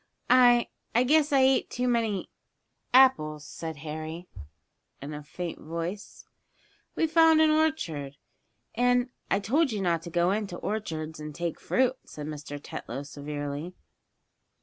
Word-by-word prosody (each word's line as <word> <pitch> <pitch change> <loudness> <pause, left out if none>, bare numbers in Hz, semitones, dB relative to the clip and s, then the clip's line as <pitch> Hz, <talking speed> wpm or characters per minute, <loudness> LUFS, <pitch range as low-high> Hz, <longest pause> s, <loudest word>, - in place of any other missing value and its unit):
"I 245 -1 +6 0.3
I 240 - +5
guess 300 +3 +3
I 275 -2 +5
ate 265 0 +3
too 250 0 -2
many 225 -5 0 0.6
apples," 155 - +4
said 160 +2 -6
Harry, 155 +3 -6 0.7
in 145 +2 -7
a 150 - -6
faint 165 +4 -6
voice. 170 +6 -6 0.7
"We - - +2
found 320 0 +5
an 315 -1 +5
orchard, 165 - 0 0.6
and 245 +1 +2
" - - -43
"I 195 - +2
told 270 +8 +2
you 210 - -2
not 170 -4 +1
to 170 - -8
go 175 +2 +2
into 200 -3 -2
orchards, 160 -7 -4
and 150 -1 -7
take 170 0 -3
fruit," 255 0 +1
said 150 - -8
Mr. 145 -1 -6
Tetlow, 135 -1 -6
severely. 145 +3 -6
180 Hz, 145 wpm, -28 LUFS, 155-250 Hz, 0.7 s, I